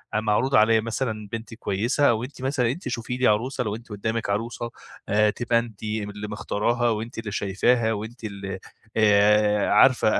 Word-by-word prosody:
معروض 110 +5 +1
عليّا 110 +1 +5
مثلًا 110 -2 -3
بنت 115 0 -6
كويسة 115 +6 +1
وأنتِ 125 +4 -5
مثلًا 130 -3 +1
أنتِ 175 +8 -6
شوفي 125 +1 -3
لي 130 - +3
عروسة، 125 +4 +1
لو 105 -1 -2
أنتِ 115 +1 -12
قدامك 110 +1 -3
عروسة 115 +3 -2 0.4
آآ، 105 +1 +4
تبقى 115 +1 +1
أنتِ 115 -3 -8
اللي 105 -1 -4
مختاراها، 115 +3 0
وأنتِ 115 +2 -3
اللي 110 -2 -5
شايفاها، 110 +3 +1
وأنتِ 110 +3 -7
اللي 100 -2 -5 0.4
آآ، 105 0 +4
عارفة 110 0 +4
110 Hz, 160 wpm, -24 LUFS, 105-120 Hz, 0.4 s, عليّا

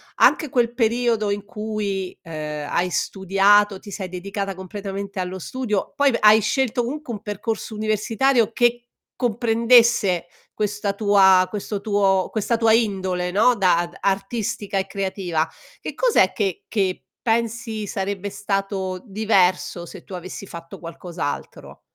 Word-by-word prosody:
anche 310 - +4
quel 240 -2 +1
periodo 230 -2 +1
in 200 0 -2
cui, 210 -3 -4
ehm, 150 -3 -5
hai 180 +1 +1
studiato, 195 +2 +3
ti 205 - -12
sei 190 -1 -5
dedicata 195 +2 -4
completamente 195 +1 -6
allo 185 0 -3
studio, 210 +1 -3
poi 285 -1 +4
v - - +2
hai 215 +1 +7
scelto 245 +2 0
comunque 295 0 -5
un 210 -3 -5
percorso 220 +1 -4
universitario 220 +3 +1
che 240 0 +1 0.3
comprendesse 230 -5 +3 0.3
questa 205 -1 -1
tua 195 -3 +5
questo 205 -1 -4
tuo 195 -3 +2
questa 225 +2 0
tua 225 -1 +4
indole, 190 -5 0
no, 205 +7 +4
da 180 -4 +3
d - - -14
artistica 195 0 -1
e 190 - -3
creativa, 190 -5 -2 0.3
che - - -6
cos'è 465 - +3
che 195 -5 -2
che 195 -4 -1 0.2
pensi 230 -1 -1
sarebbe 200 +1 -3
stato 195 -2 -2
diverso 190 -4 +1
se - - -11
tu - - -12
avessi 185 +2 -8
fatto 170 -2 -10
qualcos'altro? 170 -2 -6
200 Hz, 135 wpm, -22 LUFS, 190-225 Hz, 0.3 s, hai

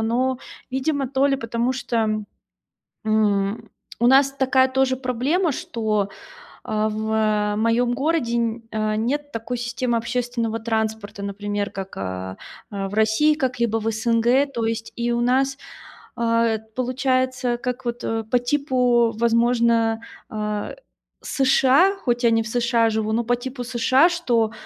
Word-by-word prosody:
но, 245 +3 0 0.3
видимо, 275 +1 -1
то 270 +2 +2
ли 275 -1 +2
потому 235 0 -1
что, 220 -4 -1 0.8
м, 210 -1 +1 0.3
у 240 - +4
нас 270 +1 +5
такая 265 -1 +3
тоже 260 0 +1
проблема, 270 +7 0
что, 215 -5 -1 0.6
а, 215 0 0
в, 220 +1 -3
э, 210 -1 +1
моём 230 +2 +2
городе 270 -4 0
нь 230 0 -1
э, 215 -1 -1
нет 285 +7 -2
такой 230 +2 -4
системы 240 0 -1
общественного 235 -1 -2
транспорта, 220 -2 -3
например, 205 +1 -3
как, 195 0 -7
а, 95 0 -5 0.3
а 195 -1 -3
в 205 - -10
России, 220 +8 +3
как-либо 240 -5 0
в 225 - -3
СНГ. 235 +4 +2
То 230 -1 -1
есть 225 0 -3
и 240 0 -1
у 235 - 0
нас, 265 +2 +2 0.6
а, 230 -1 +2
эт 220 -1 -2
получается, 255 0 0
как 250 +1 -4
вот, 240 0 -3
э, 225 0 -1
по 245 +3 +1
типу, 245 -3 +2
возможно, 230 -1 +2 0.3
а, 210 -1 -3 0.5
США, 270 +7 +3
хоть 240 -6 -1
я 235 - +5
не 225 0 +2
в - - -7
США 235 0 +2
живу, 220 0 -1
но 235 +2 +1
по 245 +1 +1
типу 250 +1 -6
США. 255 +5 +3
Что, 245 -11 +1
235 Hz, 150 wpm, -22 LUFS, 220-255 Hz, 0.8 s, нас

